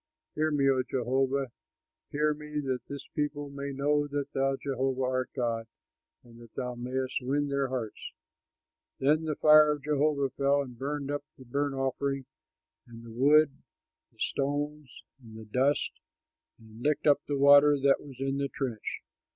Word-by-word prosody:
Hear 155 +1 +1
me, 145 -2 +2
O 130 -1 +3
Jehovah, 130 +1 0 0.6
hear 150 +1 +1
me, 150 0 -5
that 130 -3 -2
this 140 -1 -7
people 145 -1 -2
may 140 0 -5
know 145 +2 +1
that 145 -1 -4
thou, 135 0 +1
Jehovah, 135 -1 -2
art 130 0 -1
God, 115 -3 -1 0.6
and 120 -1 -16
that 115 -2 -16
thou 125 -1 -3
mayst 130 +2 -3
win 140 +3 0
their 140 -1 0
hearts." 125 -4 -5 0.9
Then 155 +4 +2
the 155 -1 -1
fire 155 0 +7
of 145 -2 -8
Jehovah 145 -2 +1
fell 140 0 +2
and 125 -3 -10
burned 140 +2 -3
up 145 0 -3
the 130 - -13
burnt 140 +3 -1
offering 135 0 -2 0.6
and 115 -1 -12
the 115 - -10
wood, 145 +5 +5 0.6
the - - -32
stones 145 0 -3 0.2
and 110 -2 -12
the 110 - -9
dust, 130 +7 +1 0.7
and 110 0 -15
licked 150 +3 0
up 145 -2 +5
the 145 - -1
water 145 +1 +7
that 135 0 +3
was 135 -4 -12
in 135 0 -1
the 140 0 -1
trench. 125 -7 -4
140 Hz, 165 wpm, -29 LUFS, 130-145 Hz, 0.9 s, fire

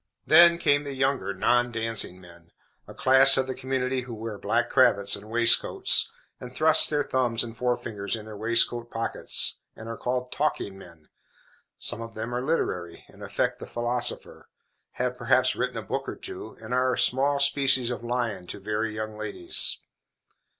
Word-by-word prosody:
Then 170 0 +7
came 145 -4 +2
the 140 -1 -6
younger 135 -4 0
non 120 +5 +1
dancing 115 -5 -3
men 85 -2 -16 0.4
a - - -11
class 135 +1 +5
of 130 - +1
the 130 - -4
community 130 0 -2
who 125 -2 -8
wear 110 -1 -7
black - - 0
cravats 100 0 +4
and 105 +2 -11
waistcoats, 115 +1 +3 0.3
and 125 0 -10
thrust 160 +1 +5
their 150 -1 0
thumbs 125 -4 0
and 115 -1 -8
forefingers 115 -4 -3
in 110 -1 -9
their 110 -1 -9
waistcoat 115 +2 +1
pockets, 115 0 -1 0.2
and 110 - -10
are 115 - -5
called 125 0 -3
"talking 145 -9 -2
men." 85 -5 -15 0.7
Some 110 - -3
of 115 0 -9
them 110 +2 -5
are 125 - -2
literary, 90 - -3
and - - -17
affect - - -2
the - - -9
philosopher; 120 +1 -2 0.4
have, - - -3
perhaps, - - +2
written - - -3
a - - -5
book - - -4
or - - -6
two, - - -8
and - - -7
are 130 0 +2
a - - -3
small 140 +3 +2
species 135 -3 +3
of 120 - -6
lion 120 -6 -3
to - - -7
very 105 +2 -3
young 110 0 -5
ladies. 105 -5 +1
120 Hz, 175 wpm, -26 LUFS, 110-130 Hz, 0.7 s, Then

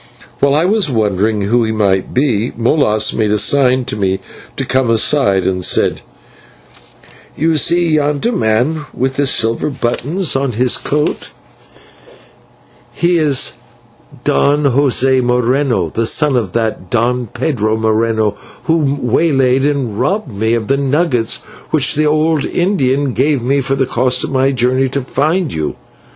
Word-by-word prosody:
While 140 0 +2
I 155 +3 +2
was 205 -3 +1
wondering 105 -2 0
who 115 +4 +1
he 110 - -1
might 100 -3 0
be, 125 -4 0
Molas 115 -3 +1
made 110 -2 0
a 105 - +2
sign 130 +3 +2
to 130 - -4
me 95 -2 -1 0.4
to 135 - -3
come 130 -1 0
aside, 115 -4 +2
and 90 -1 -1
said: - - +1 1.4
"You 160 +2 +1
see 170 +3 +2
yonder 150 +7 0
man 145 - 0
with 130 +1 -2
the 145 -1 +1
silver 115 +1 +1
buttons 145 +7 -2
on 135 -2 -1
his 125 +3 +2
coat: 150 +1 -2 1.6
he 175 0 +1
is 145 -4 +1 0.7
Don 145 - +1
José 135 -1 +2
Moreno, 125 +2 0
the 115 0 -2
son 150 +1 +3
of 110 -7 -2
that 110 -5 -2
Don 120 +2 0
Pedro 110 -3 -2
Moreno 110 -1 0 0.3
who 150 -4 0
waylaid 135 0 +1
and 130 -8 -2
robbed 155 - -1
me 110 +3 0
of 110 -3 -3
the 135 - +1
nuggets 140 -4 0 0.3
which - - +2
the 155 +1 +1
old 155 0 +1
Indian 140 -8 0
gave 140 -2 0
me 135 +3 +1
for 135 +1 -1
the 135 -1 0
cost 125 0 0
of - - -4
my 135 0 +1
journey 130 +1 +1
to 140 +1 -3
find 155 +6 -1
you. 80 -1 -3
130 Hz, 150 wpm, -14 LUFS, 115-145 Hz, 1.6 s, son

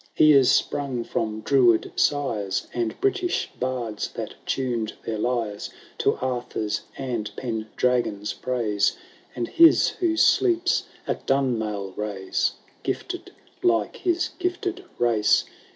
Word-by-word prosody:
He 155 0 +6
is 135 -3 +6
sprung 135 -4 0
from 110 -1 -2
Druid 120 -3 +3
sires, 115 -9 0
And 120 -2 -2
British 390 -2 0
bards 120 -5 -2
that - - -5
tuned 120 -5 -1
their 110 -2 -2
lyres 115 -3 -1 0.3
To - - +2
Arthur's 120 -4 -2 0.2
and 120 -6 -3
Pendragon's 110 -2 -1
praise, 115 -5 0 0.4
And 120 -1 -2
his 330 -1 +6
who 335 -2 -1
sleeps 355 +1 +3 0.2
at - - -4
Dunmailraise.^ 105 -6 -1 0.3
GKfted - - -4 0.3
like 115 -3 +1
his 355 0 0
gifted 365 +1 -2
race. 110 -4 +3
120 Hz, 110 wpm, -25 LUFS, 110-140 Hz, 0.4 s, He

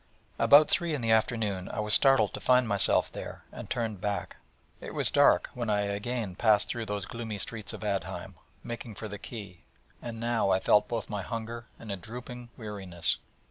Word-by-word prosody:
About 145 +1 +7
three 170 -3 +1
in 140 - -4
the 115 -1 +1
afternoon 110 -4 +1
I - - -4
was 105 0 +2
startled 135 -4 +4
to - - -4
find 125 -1 +4
myself 100 -2 +3
there, - - -8
and - - -9
turned 110 -5 -2
back. 105 -1 -3 0.4
It - - -8
was - - +3
dark - - +4
when 120 -3 -3
I 105 -1 +2
again 100 +1 -2
passed 105 +1 +3
through 115 -2 -3
those 105 -2 -2
gloomy 115 -2 -5
streets 110 +1 -3
of - - -8
Aadheim, 100 -2 -3 0.3
making 120 -1 -6
for 110 - -6
the 105 -1 -7
quay, 100 -7 -9 0.4
and 115 -1 -6
now 115 -3 +1
I 95 0 +4
felt 105 +2 +4
both 115 -2 -3
my 105 -2 -3
hunger 115 +3 -5
and 110 - -8
a 100 - -2
dropping 120 +5 -8
weariness. 95 -6 -2
110 Hz, 190 wpm, -29 LUFS, 100-120 Hz, 0.4 s, About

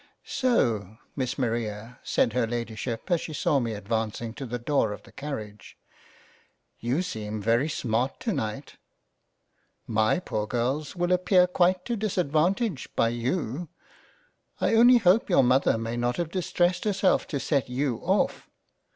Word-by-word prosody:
" - - -48 0.2
So 110 - +1 0.2
Miss 130 -3 -2
Maria 115 -2 -3
(said 115 - +1
her 125 -2 +1
Lady 115 -1 -3
ship 115 - -5
as 175 - +3
she 155 - -6
saw 150 0 +2
me 115 -3 -2
advancing 110 +2 -3
to 135 +1 -7
the 120 +1 -3
door 120 -3 0
of - - -10
the - - -17
Carriage) 110 -8 -7 1.0
you 130 +9 0
seem 110 -9 -4
very 115 +8 +2
smart 125 -2 -1
to 225 - -1
night 125 +4 -4 0.6
— - - -46 0.2
My 110 -1 +2
poor 110 -12 -3
Girls 130 +7 -2
will 175 0 0
appear 180 0 +4
quite 180 0 +2
to 240 - -1
disadvantage 185 - 0
by 115 - +3
you 130 +5 -2 0.5
— - - -39
I - - +1
only 240 +2 +7
hope 200 0 +3
your 175 -7 +5
Mother 130 -1 +3
may 115 +1 -3
not 120 0 0
have 170 -2 -2
distressed 175 -1 0
herself 195 -2 +2
to 140 - -2
set 140 -2 0
you 125 -1 -1
off. 190 - 0
130 Hz, 160 wpm, -27 LUFS, 115-175 Hz, 1.0 s, only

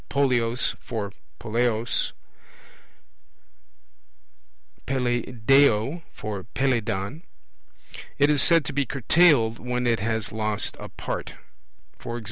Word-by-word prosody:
polleos 125 -3 +1
for 105 -5 -5 0.3
poleos, 115 0 0 2.8
Peleiadeo 125 +2 +2
for 105 -3 -6
Peleidon. 115 0 -1 1.0
It 145 +1 +4
is 145 -2 +3
said 165 -3 +4
to 145 - -4
be 140 0 0
curtailed, 135 -3 +3
when 125 0 -2
it 115 -2 +2
has 110 -1 -2
lost 110 -1 -1
a - - -8
part; - - -6 0.7
e.g. 120 0 -4
120 Hz, 95 wpm, -25 LUFS, 110-135 Hz, 2.8 s, It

